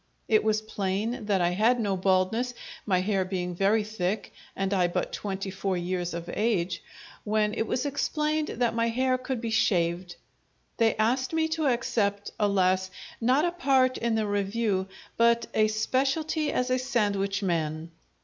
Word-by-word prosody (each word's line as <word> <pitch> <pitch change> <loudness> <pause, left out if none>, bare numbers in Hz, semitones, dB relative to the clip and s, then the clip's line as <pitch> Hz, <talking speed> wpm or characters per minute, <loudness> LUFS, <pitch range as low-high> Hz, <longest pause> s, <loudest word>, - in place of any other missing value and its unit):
It 215 -2 +3
was 215 0 +1
plain 215 +3 -2
that 195 -3 +2
I 175 0 +2
had 225 +7 +3
no 205 -4 0
baldness, 190 +6 +1 0.3
my 185 -3 +3
hair 195 0 +1
being 180 -1 -3
very 200 +4 +2
thick 210 -1 -3 0.2
and 195 +1 -1
I 180 -2 +3
but 175 - -2
twenty 195 -1 -4
four 195 -1 -2
years 175 -1 -2
of 170 0 -6
age, 195 -5 0 0.4
when 210 0 +1
it 225 - -1
was 255 - -1
explained 300 +2 0
that 240 -1 0
my 230 0 +1
hair 255 +2 +1
could 255 -1 -3
be 230 -1 -3
shaved. 175 -4 +1 0.6
They 225 -1 +3
asked 250 +6 +1
me 320 0 +2
to 315 -2 0
accept, 205 -5 0
alas! 190 -2 +2 0.3
not 260 +7 +3
a 345 - +1
part 265 -7 +2
in 230 -1 0
the 220 -1 +1
Revue, 205 -1 0 0.3
but 235 0 +4
a 215 0 +4
specialty 275 +8 0
as 250 0 0
a 255 - +2
sandwich 205 -6 0
man. 160 -2 -2
215 Hz, 165 wpm, -27 LUFS, 190-245 Hz, 0.6 s, but